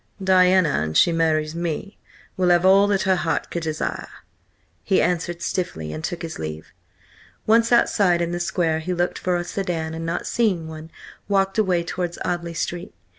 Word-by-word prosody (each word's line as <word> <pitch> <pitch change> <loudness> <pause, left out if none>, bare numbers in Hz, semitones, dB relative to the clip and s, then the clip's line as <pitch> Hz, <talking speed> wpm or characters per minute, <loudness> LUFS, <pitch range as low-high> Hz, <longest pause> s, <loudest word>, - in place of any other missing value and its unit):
"Diana, 185 -2 +4
an 80 0 -3
she 170 - +5
marries 155 -2 +1
me, 170 +4 -4 0.4
will 180 -1 +1
have 175 +1 +4
all 195 +2 +6
that 200 -2 +1
her 190 -1 +2
heart 165 -2 -2
could 170 - -3
desire," 155 -1 -3 0.8
he 195 - +2
answered 175 -1 -1
stiffly, 80 - -3
and 80 - -6
took 175 - -4
his 165 -1 -6
leave. 80 0 -7 0.7
Once 230 +2 +3
outside 200 -7 +3
in 170 0 -1
the 175 - -3
square 165 -2 0
he 180 +3 -3
looked 175 +1 -1
for 180 -1 0
a 175 - -1
sedan, 175 -3 -3
and 165 0 -5
not 165 0 -3
seeing 190 -9 0
one, 160 0 -9 0.4
walked 195 +1 +1
away 180 -5 +2
towards 175 0 -4
Audley 170 -1 -3
Street. 175 +2 -4
175 Hz, 175 wpm, -22 LUFS, 165-185 Hz, 0.8 s, all